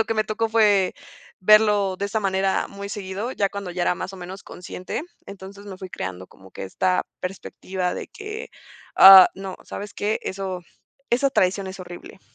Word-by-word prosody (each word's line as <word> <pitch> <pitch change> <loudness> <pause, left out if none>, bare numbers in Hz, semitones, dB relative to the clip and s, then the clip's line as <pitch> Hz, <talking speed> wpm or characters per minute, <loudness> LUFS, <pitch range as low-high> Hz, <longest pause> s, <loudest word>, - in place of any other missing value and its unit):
lo 225 - +3
que 225 - -2
me 215 0 +1
tocó 220 +1 -1
fue 210 -4 +3 0.5
verlo 210 -1 +4
de 200 - -2
esa 220 +2 -1
manera 190 -1 0
muy 200 0 -8
seguido, 200 +3 -5
ya 200 -1 0
cuando 200 -2 -6
ya 175 0 -3
era - - +2
más 190 - -6
o - - -9
menos 185 +2 -9
consciente. 180 +8 -7 0.2
Entonces, 200 +1 -11
me 190 -2 -9
fui 190 - -8
creando 95 0 -6
como 95 0 -18
que - - -7
esta 180 - 0
perspectiva 185 0 -4
de - - -6
que: 425 +2 -8 0.5
"Ah, 190 -1 +11
no 190 -1 -7
¿sabes 205 0 -8
qué? 210 +2 -1
Eso 190 -1 -4 0.5
esa 265 +3 +2
tradición 190 -4 +1
es 190 +1 -8
horrible". 175 +1 -11
195 Hz, 185 wpm, -23 LUFS, 185-210 Hz, 0.5 s, Ah